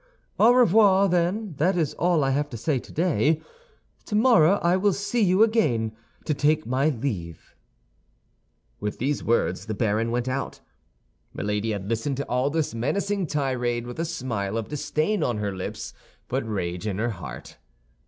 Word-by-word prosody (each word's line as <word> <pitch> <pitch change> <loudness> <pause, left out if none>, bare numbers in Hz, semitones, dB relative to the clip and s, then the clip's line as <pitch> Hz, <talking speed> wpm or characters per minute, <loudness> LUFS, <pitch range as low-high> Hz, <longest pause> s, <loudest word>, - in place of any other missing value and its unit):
"Au 225 +3 +7
revoir, 205 -5 +5
then; 180 +3 0
that 180 +6 +2
is 155 -4 0
all 170 -2 +2
I 135 - +1
have 145 +2 0
to 120 - -6
say 135 +4 0
today. 160 +1 +1 0.6
Tomorrow 210 -6 +4
I 170 +1 +4
will 195 +1 +2
see 205 +5 -1
you 190 +1 +5
again, 125 - +1 0.3
to 150 - +1
take 155 +2 +1
my 130 +5 +1
leave." 105 - -5 1.3
With 105 0 -4
these 140 +3 -1
words 95 -4 0
the 110 - -3
baron 110 +1 0
went 120 +1 -1
out. 135 +1 -3 0.8
Milady 105 +2 -2
had 100 -3 -3
listened 115 +5 -1
to 140 - -2
all 125 +3 +1
this 155 -3 -1
menacing 195 - -1
tirade 125 -5 -1
with 120 +5 -8
a 165 - 0
smile 115 -10 -3
of 115 - -4
disdain 155 +6 -1
on 120 -6 0
her 100 -2 -3
lips, 95 - -6 0.3
but 125 -3 -2
rage 90 -1 -3
in 100 -3 -2
her 115 +2 0
heart. 95 - -9
140 Hz, 165 wpm, -25 LUFS, 115-175 Hz, 1.3 s, Au